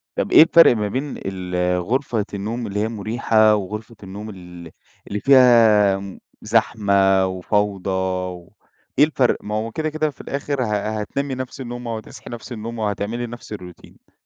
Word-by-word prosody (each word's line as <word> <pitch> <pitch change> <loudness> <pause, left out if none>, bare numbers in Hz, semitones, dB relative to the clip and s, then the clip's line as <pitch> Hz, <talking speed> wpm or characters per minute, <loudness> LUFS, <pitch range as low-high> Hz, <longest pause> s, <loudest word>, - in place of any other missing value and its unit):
طب - - -2
إيه - - +9
الفرق 165 -5 +6
ما 105 -2 -1
بين 135 +7 -4
ال-‑ 90 -1 -2
غرفة 115 +1 -1
النوم 110 +4 -4
اللي 100 0 -3
هي 110 - 0
مريحة، 110 0 +2
وغرفة 105 +3 -6
النوم 100 +3 -8
ال‑ 90 -4 -11 0.4
اللي 105 - -3
فيها 115 -6 +5
م 100 -1 -9 0.2
زحمة 100 -4 +2
وفوضى 95 +1 -1
و 90 -1 -3 0.5
إيه 145 - +8
الفرق؟ 135 -5 +1
ما 105 +1 -4
هو 110 +2 -2
كده 155 +5 -2
كده 155 0 -1
في 140 - -12
الآخر 140 -1 -3
ه‑ - - -1
ه‑ 105 +1 -2
هتنامي 135 +5 -3
نفس 130 +1 -6
النومة 120 -1 -5
وهتصحي 110 0 -10
نفس 120 +1 -9
النومة، 115 0 -5
وهتعملي 105 +4 -3
نفس 120 -2 -9
الroutine؟ 90 -4 -12
110 Hz, 165 wpm, -21 LUFS, 95-120 Hz, 0.5 s, إيه